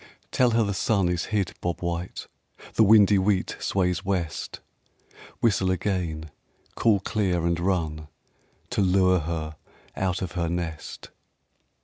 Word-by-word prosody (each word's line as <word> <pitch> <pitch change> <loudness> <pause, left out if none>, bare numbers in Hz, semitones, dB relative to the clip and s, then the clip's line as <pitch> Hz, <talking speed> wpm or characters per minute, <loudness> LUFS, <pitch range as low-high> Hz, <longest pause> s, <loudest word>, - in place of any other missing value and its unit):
Tell 125 -1 +3
her 115 0 +2
the 100 -1 -1
sun 95 -2 +1
is 90 -1 -1
hid, 100 -4 -1
bob 85 -1 -3
white, 85 0 -4 0.5
The - - +2
windy 105 -2 +6
wheat 95 0 0
sways 90 -2 0
west. 90 -5 -3 0.8
Whistle 95 -5 +2
again, 85 -5 -2 0.4
call 105 -4 +2
clear 95 -6 0
and 85 0 +1
run 80 -4 -1 0.6
To - - +1
lure 95 -1 +4
her 80 -1 -4 0.4
out 95 -1 -1
of 90 - -4
her 85 -2 -2
nest. 85 -2 -5
90 Hz, 130 wpm, -25 LUFS, 85-100 Hz, 0.8 s, windy